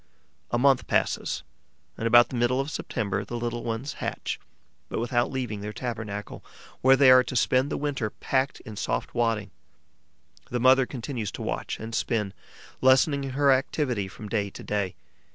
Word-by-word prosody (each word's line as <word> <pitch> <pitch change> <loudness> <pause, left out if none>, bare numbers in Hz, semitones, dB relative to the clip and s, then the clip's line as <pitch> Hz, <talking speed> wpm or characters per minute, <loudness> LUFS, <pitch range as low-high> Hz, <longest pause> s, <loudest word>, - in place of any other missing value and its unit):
A 120 - +1
month 135 +1 +3
passes - - 0 0.5
and, 115 - -2
about 120 +1 +7
the - - -5
middle 120 +2 +2
of 135 +3 -2
September, 100 -9 -2
the 120 - -5
little 120 0 -3
ones 120 +6 -3
hatch, - - -3 0.5
but - - -3
without 120 +1 +1
leaving 125 -6 -3
their 105 +1 -4
tabernacle, 110 -4 -5 0.4
where 130 +1 +7
they 130 -1 +7
are 130 0 +8
to 125 - -6
spend 130 +3 +3
the - - -2
winter 140 -6 -2
packed 135 +5 -1
in 110 - -9
soft - - -2
wadding. 115 -5 0 1.0
The 125 - -1
mother 130 +1 +5
continues 120 -4 -4
to - - -5
watch - - -3
and 110 +1 -7
spin, 105 -4 -1 0.5
lessening 135 +2 +4
her 140 +1 +3
activity 130 -5 0
from 105 +2 -9
day 100 -2 -1
to - - -10
day. 100 -3 -2
120 Hz, 170 wpm, -26 LUFS, 110-130 Hz, 1.0 s, are